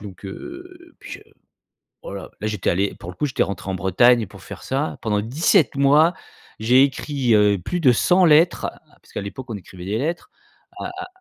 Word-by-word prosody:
donc, 100 -2 -11
heu, 345 - -10
puis - - -11
je - - -8 0.8
voilà, - - -8
j'étais 105 -3 -1
allé 100 +3 0
pour 85 - -8
le 90 - -14
coup, 150 - -1
j'étais 130 - 0
rentré 100 -1 -4
en - - -2
Bretagne 110 +6 +3
pour 95 +1 -15
faire 95 -3 -10
ça, 135 +8 -2
pendant 105 -3 0
17 140 - +2
mois. 145 +5 +4 0.4
J'ai 125 +4 +4
écrit, 135 -3 0
heu, 105 -1 +4
plus 175 - -3
de 130 -6 +5
100 180 +9 +3
lettres, 165 +2 +4
ah, - - -20 0.2
parce - - -22
qu'à - - -4
l'époque, 100 +6 -7
on 110 - -3
écrivait 90 -2 -11
des 105 +3 -2
lettres 165 +7 -3 0.5
à - - -5
à 370 -1 -6
120 Hz, 200 wpm, -21 LUFS, 100-155 Hz, 0.8 s, de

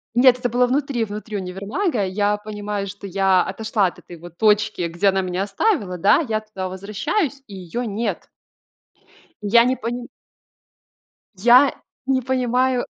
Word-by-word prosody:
Нет, 250 0 +6
это 245 -1 -1
было 245 +2 +3
внутри 265 -1 0
внутри 210 0 -6
универмага. 200 - -2
Я 205 +2 0
понимаю, 210 -1 -5
что 200 +1 -9
я 190 -1 +2
отошла 215 +1 -1
от 175 - -8
этой 175 - -12
вот 170 +1 -13
точки, 210 -3 +2
где 170 +4 0
она 190 0 +1
меня 185 +1 -2
оставила, 205 - 0
да. 200 - +4
Я 215 -1 0
туда 215 -3 -6
возвращаюсь, 255 - -2
и 200 - -10
её 190 +6 -5
нет. 225 0 -3 1.1
И 210 - -4
я 235 +3 +6
не 255 +2 +1
поним 240 +1 -5 1.3
я 245 +8 +6 0.3
не 265 -1 +1
понимаю 255 0 +1
210 Hz, 150 wpm, -21 LUFS, 195-245 Hz, 1.3 s, Нет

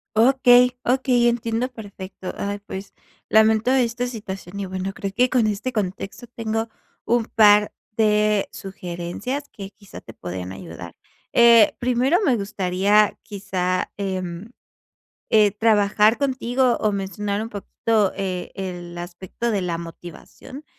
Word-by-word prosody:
Okey, 250 +1 +5
okey, 250 -1 +2
entiendo 235 +1 -1
perfecto. 200 -5 -9
Ay, 200 0 -3
pues, 195 0 -8 0.4
lamento 220 +2 +4
esta 245 -1 +1
situación, 200 -5 -7
y 200 - -3
bueno, 190 +1 -4
creo 195 0 -5
que 250 +4 +3
con 245 -3 +2
este 215 +5 -2
contexto 200 +1 -4
tengo 225 -1 -2 0.4
un 235 -1 +2
par 210 -2 +5 0.2
de 210 -2 +2
sugerencias 190 - -5
que 195 -2 -8
quizá 200 0 -13
te 115 - -12
podrían 90 -1 -6
ayudar. 85 -2 -9 0.4
Eh, 235 -2 +7
primero, 250 +6 +2
me 260 - +3
gustaría 200 0 +1
quizá, 185 -3 -2
em, 190 +1 -4 0.8
eh, 215 -2 +5
trabajar 210 0 +3
contigo 255 -2 +1
o 215 -1 0
mencionar 200 +1 -3
un 225 - -5
poquito, 210 0 0
eh, 185 -2 -4
el 175 -3 -6
aspecto 180 +6 -5
de 205 -3 0
la 175 -2 -2
motivación. 175 - -11
210 Hz, 130 wpm, -22 LUFS, 190-235 Hz, 0.8 s, Eh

